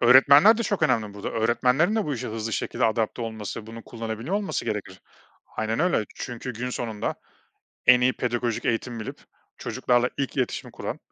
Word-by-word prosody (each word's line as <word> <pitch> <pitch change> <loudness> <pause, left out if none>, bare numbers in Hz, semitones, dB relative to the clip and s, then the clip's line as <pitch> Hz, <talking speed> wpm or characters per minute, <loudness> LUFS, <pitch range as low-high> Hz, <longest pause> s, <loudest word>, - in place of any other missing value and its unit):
Öğretmenler 140 - +7
de - - +1
çok 200 -5 -1
önemli 110 -8 +1
burada. 100 - -5
Öğretmenlerin 125 - +2
de 215 - +1
bu 145 - -2
işe 115 - -4
hızlı 110 0 -4
şekilde - - -1
adapte 115 +1 0
olması, 110 -1 -5
bunu 115 0 -9
kullanabiliyor 115 - -4
olması 205 -1 -1
gerekir. 95 -3 -4 0.6
Aynen 110 +5 -1
öyle. 175 -11 +2
Çünkü 125 0 -5
günün 125 +3 -4
sonunda 110 -4 -3 0.7
en 125 -1 +8
iyi 130 +1 +3
pedagojik 120 -2 -2
eğitimi 115 0 -1
bilip 110 - -7 0.4
çocuklarla 125 0 +1
ilk 140 0 -2
iletişimi 130 -2 -2
kuran - - -5
120 Hz, 165 wpm, -25 LUFS, 110-130 Hz, 0.7 s, en